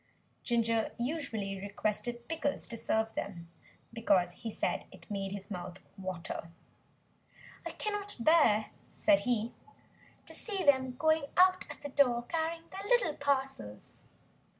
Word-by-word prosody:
Ginger 230 Hz, -2 st, +1 dB
usually 235 Hz, -8 st, -2 dB
requested 215 Hz, +4 st, -2 dB
Pickles 310 Hz, -3 st, -1 dB
to 235 Hz, -, -5 dB
serve 220 Hz, -1 st, 0 dB
them, 170 Hz, -4 st, -5 dB, 0.4 s
because 195 Hz, -6 st, +3 dB
he 225 Hz, +5 st, -6 dB
said -, -, -1 dB
it -, -, -14 dB
made 195 Hz, -1 st, -2 dB
his 200 Hz, +1 st, -7 dB
mouth 180 Hz, -1 st, -5 dB, 0.2 s
water. 185 Hz, -3 st, -5 dB, 1.2 s
"I -, -, -4 dB
cannot 415 Hz, -1 st, -3 dB
bear," 235 Hz, -7 st, +5 dB, 0.2 s
said 305 Hz, -2 st, +4 dB
he, 235 Hz, -2 st, 0 dB, 0.7 s
"to -, -, -6 dB
see 400 Hz, -4 st, -2 dB
them 260 Hz, -3 st, +4 dB
going 315 Hz, +2 st, +3 dB
out 370 Hz, 0 st, +6 dB
at 295 Hz, -, -8 dB
the 285 Hz, -, -4 dB
door 250 Hz, -4 st, +3 dB
carrying 330 Hz, +4 st, -2 dB
their 385 Hz, -, -6 dB
little 485 Hz, -11 st, +4 dB
parcels." 270 Hz, -, -2 dB
240 Hz, 130 wpm, -32 LUFS, 205-310 Hz, 1.2 s, out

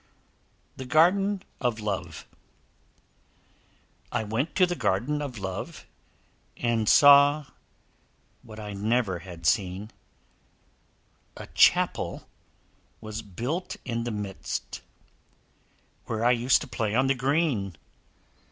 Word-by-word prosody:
THE 130 Hz, -, -6 dB
GARDEN 190 Hz, +7 st, +3 dB, 0.2 s
OF 120 Hz, -4 st, -1 dB
LOVE 95 Hz, -6 st, -4 dB, 1.9 s
I -, -, -1 dB
went 115 Hz, +9 st, -2 dB
to 185 Hz, -, +5 dB
the 175 Hz, -, -2 dB
Garden 125 Hz, -, 0 dB
of 135 Hz, -5 st, -5 dB
Love, 95 Hz, -2 st, -6 dB, 0.7 s
And 115 Hz, -3 st, 0 dB
saw 145 Hz, +1 st, +7 dB, 1.0 s
what 110 Hz, -1 st, -12 dB
I 105 Hz, -1 st, -6 dB
never 105 Hz, -2 st, 0 dB
had 85 Hz, -2 st, -11 dB
seen; 95 Hz, +6 st, 0 dB, 1.5 s
A -, -, -8 dB
Chapel -, -, +2 dB, 0.7 s
was 110 Hz, 0 st, -6 dB
built 120 Hz, -, -4 dB
in 115 Hz, -2 st, -2 dB
the 120 Hz, -, -3 dB
midst, 105 Hz, -3 st, -5 dB, 1.2 s
Where 110 Hz, +1 st, -2 dB
I 120 Hz, -, +5 dB
used 125 Hz, +1 st, +3 dB
to -, -, -6 dB
play 110 Hz, -3 st, -2 dB
on 130 Hz, +2 st, +3 dB
the 135 Hz, -, +3 dB
green. 130 Hz, -, 0 dB
115 Hz, 105 wpm, -26 LUFS, 105-140 Hz, 1.9 s, saw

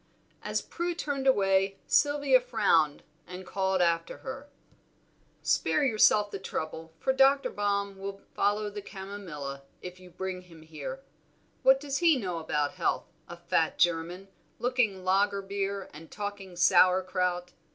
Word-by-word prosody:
As -, -, -2 dB
Prue 345 Hz, 0 st, -3 dB
turned 280 Hz, -4 st, -2 dB
away, 195 Hz, -4 st, +3 dB
Sylvia 285 Hz, -3 st, +4 dB
frowned 205 Hz, -11 st, +2 dB, 0.2 s
and 180 Hz, +1 st, -8 dB
called 190 Hz, -1 st, +1 dB
after 165 Hz, -1 st, 0 dB
her 270 Hz, +2 st, -7 dB, 0.9 s
"Spare 300 Hz, -, +2 dB
yourself 215 Hz, -4 st, +4 dB
the 195 Hz, -, -5 dB
trouble, 160 Hz, -3 st, -5 dB
for 265 Hz, -, 0 dB
Dr. 270 Hz, 0 st, +4 dB
Baum 200 Hz, -1 st, -1 dB
will 195 Hz, 0 st, -6 dB
follow 205 Hz, +1 st, 0 dB
the 205 Hz, 0 st, -6 dB
chamomilla, 190 Hz, -9 st, -7 dB, 0.2 s
if 180 Hz, 0 st, -8 dB
you 185 Hz, 0 st, -14 dB
bring 185 Hz, +1 st, -5 dB
him 165 Hz, -3 st, -16 dB
here. 210 Hz, -, -7 dB, 0.6 s
What 265 Hz, 0 st, +6 dB
does 280 Hz, -1 st, -3 dB
he 335 Hz, -4 st, +5 dB
know 180 Hz, -8 st, -3 dB
about 150 Hz, -2 st, -1 dB
health, 185 Hz, -2 st, -2 dB, 0.2 s
a 175 Hz, -, -9 dB
fat 165 Hz, -1 st, 0 dB
German, 175 Hz, +3 st, 0 dB, 0.3 s
looking 240 Hz, -7 st, 0 dB
lager 200 Hz, +1 st, +2 dB
beer 195 Hz, 0 st, -3 dB
and 155 Hz, +2 st, -12 dB
talking 205 Hz, -3 st, -6 dB
sauer 185 Hz, +1 st, +5 dB
kraut? 180 Hz, -1 st, -1 dB
195 Hz, 140 wpm, -29 LUFS, 180-220 Hz, 0.9 s, What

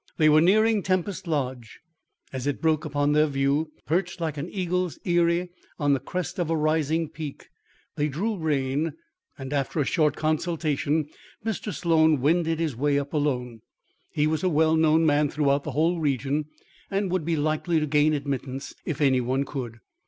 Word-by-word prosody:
They 155 Hz, -2 st, +5 dB
were 155 Hz, +1 st, +6 dB
nearing 215 Hz, +4 st, +4 dB
Tempest 185 Hz, 0 st, -1 dB
Lodge. 130 Hz, -7 st, -3 dB, 0.5 s
As 130 Hz, +1 st, -3 dB
it 145 Hz, -, -1 dB
broke 160 Hz, -1 st, +1 dB
upon 145 Hz, -1 st, 0 dB
their 150 Hz, +1 st, +4 dB
view, 140 Hz, +2 st, 0 dB
perched 175 Hz, +2 st, -1 dB
like 160 Hz, -3 st, -2 dB
an 150 Hz, +4 st, -5 dB
eagle's 180 Hz, -2 st, -1 dB
eyrie 175 Hz, 0 st, +2 dB, 0.3 s
on 145 Hz, -3 st, +2 dB
the 135 Hz, -, +1 dB
crest 180 Hz, +3 st, -4 dB
of 170 Hz, -2 st, -1 dB
a 165 Hz, -, +1 dB
rising 155 Hz, +1 st, +1 dB
peak, 150 Hz, -2 st, -8 dB, 0.5 s
they 150 Hz, -, +1 dB
drew 195 Hz, +10 st, -2 dB
rein, 150 Hz, -2 st, -1 dB, 0.4 s
and, 135 Hz, 0 st, -6 dB
after 140 Hz, +2 st, -1 dB
a 145 Hz, -, +2 dB
short 150 Hz, 0 st, +2 dB
consultation, 155 Hz, -1 st, 0 dB, 0.4 s
Mr. 220 Hz, -1 st, -2 dB
Sloan 160 Hz, -2 st, +3 dB
wended 165 Hz, +3 st, +1 dB
his 160 Hz, -6 st, -1 dB
way 140 Hz, +3 st, +1 dB
up 140 Hz, 0 st, -3 dB
alone. 125 Hz, -6 st, -1 dB, 0.5 s
He 150 Hz, -, 0 dB
was 155 Hz, 0 st, 0 dB
a 185 Hz, -, +3 dB
well 160 Hz, 0 st, +3 dB
known 160 Hz, 0 st, +4 dB
man 145 Hz, -1 st, +3 dB
throughout 140 Hz, -1 st, +1 dB
the 150 Hz, -, -3 dB
whole 165 Hz, +5 st, +1 dB
region, 140 Hz, 0 st, 0 dB, 0.4 s
and 195 Hz, -2 st, -1 dB
would 185 Hz, -3 st, 0 dB
be 165 Hz, +1 st, 0 dB
likely 155 Hz, +2 st, 0 dB
to 155 Hz, -, 0 dB
gain 150 Hz, +1 st, +3 dB
admittance 135 Hz, -1 st, -4 dB
if 155 Hz, -2 st, -4 dB
any 130 Hz, -3 st, +4 dB
one 130 Hz, +3 st, 0 dB
could. 120 Hz, -5 st, -6 dB
155 Hz, 175 wpm, -25 LUFS, 140-165 Hz, 0.5 s, were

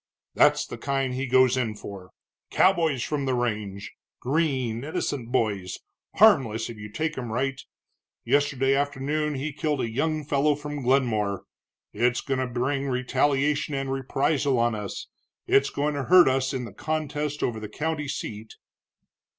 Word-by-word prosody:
"That's -, -, +4 dB
the -, -, -8 dB
kind 135 Hz, -2 st, -1 dB
he 135 Hz, +2 st, -2 dB
goes 130 Hz, 0 st, +4 dB
in 115 Hz, -4 st, -1 dB
for, 100 Hz, -3 st, -9 dB, 0.4 s
cowboys 165 Hz, -9 st, +3 dB
from 145 Hz, -2 st, -2 dB
the 130 Hz, -1 st, 0 dB
range, 105 Hz, -5 st, -3 dB, 0.3 s
green, 130 Hz, -5 st, 0 dB
innocent 140 Hz, -5 st, -3 dB
boys, 100 Hz, -7 st, -1 dB, 0.4 s
harmless 120 Hz, -, +4 dB
if 115 Hz, -, -11 dB
you 105 Hz, 0 st, -8 dB
take 155 Hz, +7 st, -2 dB
'em 120 Hz, -3 st, -5 dB
right. 135 Hz, +3 st, -1 dB, 0.6 s
Yesterday 140 Hz, -2 st, +2 dB
afternoon 145 Hz, +2 st, -1 dB
he 140 Hz, +3 st, -3 dB
killed 150 Hz, 0 st, -1 dB
a 115 Hz, -, -2 dB
young 155 Hz, +5 st, -1 dB
fellow 145 Hz, +1 st, +2 dB
from 145 Hz, 0 st, -6 dB
Glenmore. 115 Hz, -7 st, +1 dB, 0.5 s
It's 120 Hz, +3 st, +1 dB
going 135 Hz, -2 st, -2 dB
to 130 Hz, -, 0 dB
bring 135 Hz, +3 st, -1 dB
retaliation 140 Hz, +3 st, +1 dB
and 135 Hz, 0 st, -2 dB
reprisal 135 Hz, +1 st, 0 dB
on 120 Hz, 0 st, +2 dB
us, 105 Hz, -3 st, -5 dB, 0.4 s
it's 135 Hz, 0 st, +3 dB
going 150 Hz, +1 st, -1 dB
to 140 Hz, -2 st, -3 dB
hurt 180 Hz, +3 st, +7 dB
us 130 Hz, 0 st, +1 dB
in 130 Hz, -2 st, -3 dB
this 105 Hz, -, -10 dB
contest 150 Hz, -1 st, -2 dB
over 110 Hz, -2 st, -1 dB
the 105 Hz, -1 st, -7 dB
county 150 Hz, +4 st, -3 dB
seat." 110 Hz, -5 st, -6 dB
135 Hz, 155 wpm, -26 LUFS, 120-145 Hz, 0.6 s, hurt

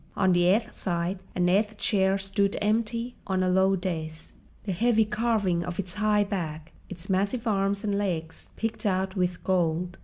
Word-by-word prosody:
On 190 Hz, -2 st, +3 dB
the 175 Hz, 0 st, +3 dB
eighth 215 Hz, +6 st, +2 dB
side 175 Hz, +1 st, -2 dB, 0.2 s
an 180 Hz, 0 st, +2 dB
eighth 210 Hz, +4 st, +2 dB
chair 195 Hz, -2 st, +2 dB
stood 195 Hz, +1 st, 0 dB
empty 230 Hz, +3 st, -1 dB
on 190 Hz, -1 st, +1 dB
a -, -, +1 dB
low 190 Hz, +1 st, +3 dB
dais, 160 Hz, -4 st, -5 dB, 0.3 s
the 200 Hz, -, -3 dB
heavy 220 Hz, +4 st, +3 dB
carving 210 Hz, -5 st, 0 dB
of 175 Hz, 0 st, -5 dB
its 185 Hz, -3 st, -4 dB
high 210 Hz, 0 st, +2 dB
back, 165 Hz, -5 st, -5 dB, 0.2 s
its 185 Hz, -1 st, -8 dB
massive 200 Hz, +5 st, 0 dB
arms 200 Hz, -1 st, 0 dB
and 205 Hz, -2 st, 0 dB
legs, 170 Hz, -5 st, -3 dB
picked 225 Hz, -1 st, -2 dB
out 190 Hz, 0 st, 0 dB
with 180 Hz, -1 st, -1 dB
gold. 175 Hz, -1 st, 0 dB
190 Hz, 175 wpm, -27 LUFS, 180-210 Hz, 0.3 s, On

